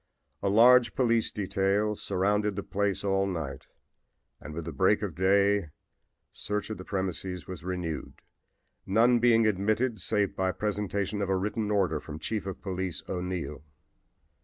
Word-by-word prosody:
A 100 - +1
large 120 +3 +6
police 115 -4 +2
detail 100 +1 0
surrounded 105 +1 0
the 100 - -3
place 100 0 -1
all 95 -1 +1
night 80 -8 -5 0.7
and 75 - -9
with 85 -1 -5
the 80 - -4
break 70 - +2
of - - -3
day 100 -1 +2 0.6
search 105 +1 -3
of 105 - -5
the - - -6
premises 95 -2 -3
was 90 -3 -8
renewed, 90 -4 -5 0.6
none 120 +5 +4
being 115 -1 +4
admitted 110 +3 +1
save 100 +1 0
by 95 -1 0
presentation 100 0 -2
of 100 - -1
a 95 - +2
written 105 +2 -2
order 95 -7 +1
from 75 0 -8
Chief 100 +5 -3
of 95 - -6
Police 95 -3 -3
O'Neill. 90 -6 -4
100 Hz, 150 wpm, -28 LUFS, 90-105 Hz, 0.7 s, large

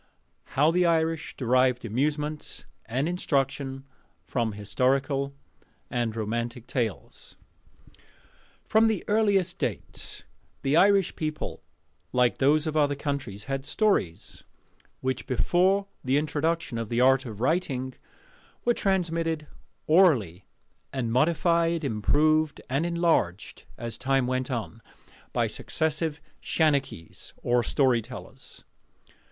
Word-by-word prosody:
HOW 150 +4 +5
THE 180 +1 +3
IRISH 165 -1 0
DERIVED 125 -1 +2
AMUSEMENT 150 +6 -2 0.2
AND 130 +6 0
INSTRUCTION 135 -5 -1 0.4
FROM 115 -4 -1
HISTORICAL 135 +6 0 0.6
AND 120 -2 -1
ROMANTIC 115 +2 -3
TALES. 110 - -4 1.3
From 220 +1 +4
the 220 -5 0
earliest 205 -4 +2
date, - - -5 0.4
the 135 +2 +2
Irish 195 +1 +4
people, 155 -1 -4 0.5
like 125 -1 +2
those 150 +3 +4
of 155 -1 -2
other 145 -2 +3
countries, 140 -9 -4
had 135 +1 -3
Stories, 145 - 0 0.6
which, 130 -1 -2
before 185 +9 +2 0.2
the 130 +2 +2
introduction 155 -3 -1
of 115 -2 -4
the 120 - 0
art 135 +1 +4
of 110 -3 -8
writing, 130 -2 0 0.7
were 240 - +4
transmitted 165 -6 0 0.4
orally, 130 - +3 0.4
and 125 -4 -2
modified, 165 +4 +2
improved, 150 +6 +2
and 145 +6 +1
enlarged 170 - 0
as 115 -1 -6
time 135 0 +2
went 130 +1 -1
on, 115 -2 -4 0.5
by - - +1
successive 155 0 -1 0.2
shanachies, 140 - -1
or 120 0 +3
'storytellers. 125 -2 -2
140 Hz, 105 wpm, -27 LUFS, 125-165 Hz, 1.3 s, HOW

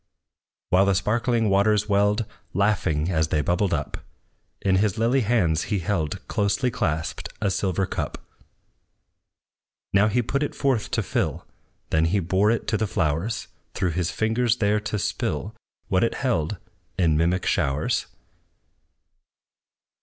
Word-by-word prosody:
While 95 +2 +5
the 100 - +3
sparkling 115 +3 +1
waters 105 +1 +3
welled, 105 +2 +2 0.3
Laughing 95 -5 +1
as 80 -3 +1
they 75 -1 +1
bubbled 90 +6 +1
up, - - -2 0.6
In 95 -1 +2
his 100 -1 +1
lily 120 +4 +2
hands 95 -8 +1
he 105 - -1
held, 85 -4 -2
Closely 105 +5 0
clasped, 80 -9 -2
a 100 -2 0
silver 95 0 0
cup. - - -4 1.8
Now 100 +2 +5
he 120 +3 +1
put 140 +4 -1
it 145 - -2
forth 130 -6 0
to - - 0
fill; - - -2 0.5
Then 80 +1 +3
he 95 +5 +2
bore 95 +4 +2
it 115 0 0
to 110 - +1
the 110 +1 0
flowers, 85 +5 -1 0.3
Through 90 - 0
his 85 +1 -1
fingers 115 +2 +1
there 105 -1 +2
to 105 0 -3
spill 105 +1 -2 0.3
What 95 -2 +2
it 115 - 0
held, 95 - -1 0.4
in 85 -4 +3
mimic 85 +4 +1
showers. 70 +2 0
100 Hz, 140 wpm, -24 LUFS, 90-110 Hz, 1.8 s, While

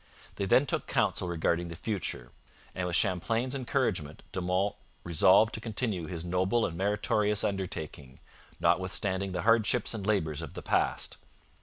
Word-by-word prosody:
They 100 - -1
then 130 +8 +5
took - - -2
counsel 90 - 0
regarding 85 0 0
the 85 - -7
future, 85 - -3 0.4
and 90 -1 -2
with 85 - -1
Champlain's 115 +8 +1
encouragement 120 - -1
De 95 - -3
Monts 90 +3 0 0.3
'resolved 95 +6 +5
to 110 - -4
continue 110 -6 -2
his 85 -2 -5
noble 95 +6 +1
and 85 - -4
meritorious 105 +2 +1
undertaking, 80 -8 -4 0.4
notwithstanding 95 +1 +1
the 90 -1 -3
hardships 115 +2 +2
and 110 -3 -5
labours 80 -8 0
of 80 - -8
the - - -7
past.' - - 0
95 Hz, 150 wpm, -30 LUFS, 85-110 Hz, 0.4 s, then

